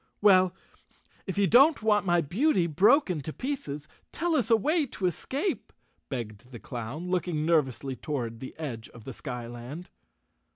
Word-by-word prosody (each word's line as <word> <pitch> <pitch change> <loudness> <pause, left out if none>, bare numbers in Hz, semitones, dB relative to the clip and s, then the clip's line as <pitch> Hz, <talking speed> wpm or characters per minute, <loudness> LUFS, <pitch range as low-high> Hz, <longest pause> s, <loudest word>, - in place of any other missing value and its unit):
"Well, 185 -3 +5 0.7
if 190 - -4
you 200 - +4
don't 270 - +5
want 210 -2 +3
my 175 -1 +4
beauty 190 - +2
broken 185 - +3
to 155 - -5
pieces 155 - -5 0.2
tell 335 -1 0
us 250 -6 +1
a 230 - +7
way 300 - +1
to 195 - -4
escape," 270 - -2 0.4
begged 115 -3 -6
the 125 - -9
clown, 130 +11 -6
looking 175 -4 0
nervously 140 -5 +1
toward 120 -5 -4
the 130 - -8
edge 125 -8 -6
of 120 - -14
the 130 - -7
skyland. 125 +6 -7
170 Hz, 155 wpm, -28 LUFS, 130-210 Hz, 0.7 s, a